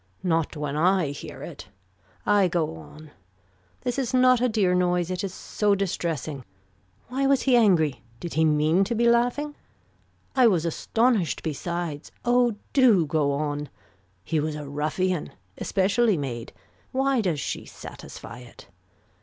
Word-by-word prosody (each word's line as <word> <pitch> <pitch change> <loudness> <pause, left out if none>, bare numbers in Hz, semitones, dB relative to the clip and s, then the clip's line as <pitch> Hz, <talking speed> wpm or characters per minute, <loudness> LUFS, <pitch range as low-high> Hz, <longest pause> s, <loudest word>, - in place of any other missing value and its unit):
Not 165 -3 0
when 145 -1 -3
I 180 0 +3
hear 145 - -8
it. - - -9 0.6
I 205 -2 +4
go 170 - -1
on. 150 - -13 0.7
This 245 +2 -2
is 255 -1 -1
not 255 -1 +5
a 250 - +3
dear 205 -5 +2
noise. 180 -1 +1
It 185 - -3
is 195 - -3
so 205 +2 0
distressing. 165 -7 -3 0.7
Why 270 +2 0
was 275 -1 +3
he 260 -2 +4
angry. 160 - +3 0.2
Did 170 - -6
he 160 - +2
mean 155 +4 +3
to 235 - -2
be 235 +1 +3
laughing. 245 +5 +2 0.8
I 255 -3 +6
was 175 -7 +2
astonished 225 +3 +1
besides. 160 0 -4
Oh 245 -2 +3 0.2
do 235 - +5
go 150 -1 +1
on. 145 0 -2 0.5
He 160 - 0
was 150 0 -2
a 150 -1 -6
ruffian. 155 +5 -1 0.3
Especially 200 +2 +2
made. 125 -5 -5 0.4
Why 270 -1 +2
does 175 -8 -1
she - - -4
satisfy 115 - -10
it. 125 -1 -14
180 Hz, 145 wpm, -25 LUFS, 155-235 Hz, 0.8 s, I